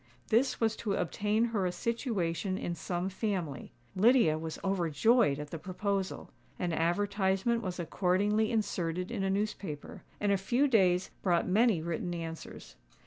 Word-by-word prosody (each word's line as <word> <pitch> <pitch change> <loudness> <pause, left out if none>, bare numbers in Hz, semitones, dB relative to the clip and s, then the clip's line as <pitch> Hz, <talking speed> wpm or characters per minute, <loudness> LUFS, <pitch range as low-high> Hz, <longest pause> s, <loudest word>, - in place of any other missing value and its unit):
This 240 +4 +2
was 225 -1 +1
to 205 -3 -1
obtain 210 +5 0
her 210 -6 0
a - - -1
situation 195 - -2
in 175 - -3
some 175 +2 -3
family. 185 - -3 0.2
Lydia 215 -5 +5
was 160 0 -5
overjoyed 190 - +3
at 150 0 -7
the 165 - -5
proposal. 195 +3 -3 0.3
An 175 -2 -1
advertisement 195 +6 +1
was 185 -4 -4
accordingly 200 +5 +1
inserted 180 -5 -1
in 195 - -2
a 195 - +1
newspaper; 195 -6 -3 0.2
and 205 -1 +1
a 200 - +3
few 240 +9 +2
days 185 -7 +3
brought 175 -3 +2
many 205 -3 +3
written 170 +1 -3
answers. 165 -1 -8
190 Hz, 145 wpm, -31 LUFS, 170-215 Hz, 0.3 s, Lydia